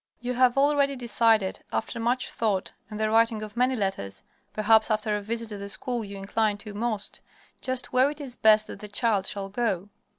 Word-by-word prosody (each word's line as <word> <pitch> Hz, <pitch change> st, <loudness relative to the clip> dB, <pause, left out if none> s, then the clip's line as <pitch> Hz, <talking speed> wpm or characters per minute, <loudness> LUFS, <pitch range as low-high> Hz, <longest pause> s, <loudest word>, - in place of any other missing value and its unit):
You 245 Hz, +1 st, -3 dB
have 250 Hz, 0 st, +3 dB
already 280 Hz, 0 st, +3 dB
decided, 225 Hz, -5 st, +2 dB
after 230 Hz, -, -3 dB
much 245 Hz, +3 st, 0 dB
thought 205 Hz, -5 st, -1 dB, 0.2 s
and 210 Hz, -1 st, -7 dB
the 215 Hz, 0 st, +1 dB
writing 225 Hz, -1 st, +3 dB
of 215 Hz, +1 st, -8 dB
many 250 Hz, +2 st, +2 dB
letters 145 Hz, -, -3 dB, 0.3 s
perhaps 220 Hz, +1 st, +4 dB
after 215 Hz, -1 st, 0 dB
a 210 Hz, -, -2 dB
visit 230 Hz, +2 st, -4 dB
to 205 Hz, -2 st, -6 dB
the 200 Hz, 0 st, -6 dB
school 235 Hz, +3 st, -2 dB
you 200 Hz, -1 st, -8 dB
incline 205 Hz, +2 st, 0 dB
to 205 Hz, 0 st, -9 dB
most 215 Hz, -1 st, -3 dB, 0.4 s
just 255 Hz, -1 st, -1 dB
where 255 Hz, +2 st, +4 dB
it 295 Hz, +1 st, -7 dB
is 265 Hz, -4 st, 0 dB
best 215 Hz, -2 st, +5 dB
that -, -, -9 dB
the 210 Hz, -, -7 dB
child 205 Hz, -2 st, 0 dB
shall 195 Hz, -1 st, -4 dB
go. 205 Hz, -3 st, -1 dB
220 Hz, 200 wpm, -26 LUFS, 205-245 Hz, 0.4 s, best